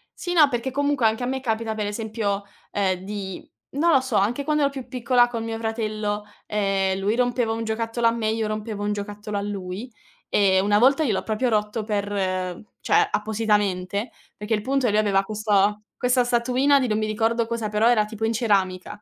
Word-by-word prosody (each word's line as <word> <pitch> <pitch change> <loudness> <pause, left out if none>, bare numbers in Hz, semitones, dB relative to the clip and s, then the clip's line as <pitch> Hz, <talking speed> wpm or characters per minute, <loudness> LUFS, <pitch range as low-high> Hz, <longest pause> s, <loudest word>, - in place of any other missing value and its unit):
sì, 355 - -4
no, 315 -4 +7
perché 240 0 -2
comunque 285 -2 +1
anche 220 +3 -1
a - - 0
me 265 +1 -2
capita 225 -2 -1
per 210 -1 -2
esempio, 210 -2 -2 0.3
ehm, 190 -3 0
di 195 -2 -6 0.2
non 325 +5 +2
lo 270 - +6
so, 260 -4 -3
anche 230 +8 +1
quando 300 0 +1
ero 280 - +2
più 265 -2 -7
piccola 245 -1 +3
col 235 -2 -4
mio 225 0 -4
fratello, 215 -2 -2 0.2
ehm, 195 -2 0
lui 205 +3 0
rompeva 245 -2 +1
un 225 - -3
giocattolo 225 +1 -2
a - - +4
me, 230 -1 -2
io 220 0 -1
rompevo 215 -1 -4
un 210 0 0
giocattolo 205 0 -5
a - - -1
lui, 200 +3 -5 0.4
e 190 -2 +3
una 205 +2 +3
volta 275 +6 +4
gliel'ho 215 -9 0
proprio 225 +3 0
rotto 215 0 0
per 205 -2 -2 0.7
cioè - - +3
appositamente, 210 -1 0 0.3
perché 210 +2 -3
il 210 - +1
punto 270 +3 0
è - - +2
lui 210 - +3
aveva 195 -2 +2
questa 210 -1 +1 0.2
questa 250 0 +2
statuina 255 +4 +3
di 255 - 0
non 215 - 0
mi 215 - -1
ricordo 225 +2 0
cosa, 230 -2 -2
però 215 +2 +3
era 220 -3 +3
tipo 220 +1 -7
in 225 - 0
ceramica. 205 -3 0
220 Hz, 200 wpm, -24 LUFS, 205-240 Hz, 0.7 s, no